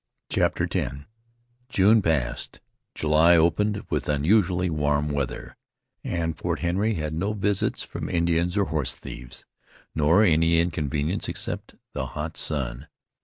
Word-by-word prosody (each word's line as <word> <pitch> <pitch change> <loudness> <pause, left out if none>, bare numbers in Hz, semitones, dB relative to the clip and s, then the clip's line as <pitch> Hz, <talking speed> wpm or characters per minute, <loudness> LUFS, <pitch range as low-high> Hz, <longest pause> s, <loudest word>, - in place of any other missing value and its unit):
CHAPTER - - +1
X - - -1 0.7
June 105 0 +4
passed; 75 -8 -1 0.4
July 80 +3 +4
opened 100 +6 +2
with - - -1
unusually 90 +4 +2
warm 75 -2 0
weather, 70 -3 -3 0.5
and 80 -1 -2
Fort - - -2
Henry 100 +6 0
had 75 -2 -3
no 95 +7 -1
visits 100 -1 0
from - - -6
Indians 85 +1 +1
or 100 - +3
horse 75 -7 -1
thieves, 60 0 -10 0.5
nor 80 +7 +4
any 85 -2 +4
inconvenience 80 0 -1
except - - -4 0.2
the 65 - -3
hot 80 +2 -4
sun. 65 -2 -3
80 Hz, 125 wpm, -25 LUFS, 75-90 Hz, 0.7 s, June